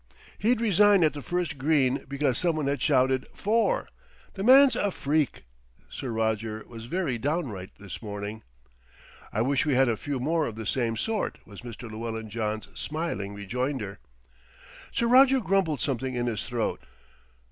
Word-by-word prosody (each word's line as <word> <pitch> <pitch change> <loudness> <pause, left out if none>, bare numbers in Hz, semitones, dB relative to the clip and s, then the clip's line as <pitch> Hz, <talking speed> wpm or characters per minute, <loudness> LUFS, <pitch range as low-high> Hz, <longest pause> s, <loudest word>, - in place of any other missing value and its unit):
"He'd 230 +3 +2
resign 205 -3 +5
at 155 - +3
the 145 - -6
first 175 -3 -2
green 135 -2 +2
because 140 -2 0
someone 160 -4 0
had 140 +1 -1
shouted 130 -2 +2
'fore.' 225 +3 +1 0.5
The 195 - -6
man's 260 +3 +7
a 205 - +1
freak!" 150 -5 -1 0.5
Sir 130 - -5
Roger 110 -1 -1
was 115 -1 -9
very 140 -3 -1
downright 130 - -2
this 100 -3 -8
morning. 105 0 -5 0.9
"I 110 - +1
wish 135 +2 +2
we 145 -4 +1
had 130 +1 +4
a 115 - +2
few 140 +4 -4
more 160 +4 +1
of 110 - -6
the 110 0 -6
same 115 0 0
sort," 220 - -2
was 100 -3 -11
Mr. 120 -1 -9
Llewellyn 110 0 -5
John's 110 -1 -2
smiling 125 -11 -4
rejoinder. 110 +1 -3 0.9
Sir 235 - 0
Roger 265 +2 +6
grumbled 185 - +1
something 130 -1 -1
in 120 0 -1
his 120 -1 -2
throat. 120 -3 -2
130 Hz, 160 wpm, -27 LUFS, 110-165 Hz, 0.9 s, man's